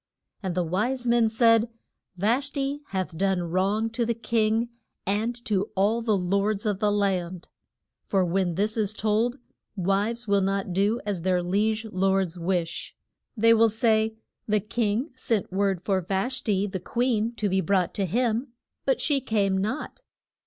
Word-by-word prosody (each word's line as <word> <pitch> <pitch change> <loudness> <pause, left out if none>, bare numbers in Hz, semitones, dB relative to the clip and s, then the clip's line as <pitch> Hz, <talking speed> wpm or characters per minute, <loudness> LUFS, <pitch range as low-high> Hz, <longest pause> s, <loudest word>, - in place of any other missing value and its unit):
And 185 -4 -3
the 180 - +1
wise 230 +10 -1
men 235 -2 +3
said, 230 0 +4 0.5
Vash 235 +9 +1
ti 280 0 -2
hath 185 -3 -3
done 190 0 +1
wrong 190 +6 0
to 235 +1 -1
the 235 0 0
king 225 0 +1 0.4
and 215 +5 0
to 205 -3 0
all 210 +4 +2
the 220 -3 +1
lords 200 +3 0
of 205 -3 0
the 210 -1 +2
land. 185 -4 -1 0.6
For 190 -2 +2
when 175 -1 0
this 210 +4 0
is 215 -1 0
told, 220 +4 +1 0.4
wives 205 +5 0
will 200 -1 +3
not 195 -1 -1
do 205 +5 +1
as 200 -4 -2
their 180 0 +1
liege 215 +5 0
lords 190 -3 0
wish. 175 -1 -2 0.4
They 230 +1 +6
will 225 0 +5
say, 220 0 +2 0.3
The 210 0 +2
king 215 - -1
sent 225 -7 -2
word 195 -2 0
for 190 -2 +1
Vash 195 +9 -2
ti, 200 -3 +1
the 190 -2 -4
queen, 235 +3 0
to 210 - -1
be 190 0 +1
brought 190 -2 +1
to 195 -2 -1
him, 235 - 0 0.3
but - - +2
she 285 -3 +1
came 205 -6 +1
not. 215 - -3
205 Hz, 165 wpm, -26 LUFS, 190-230 Hz, 0.6 s, They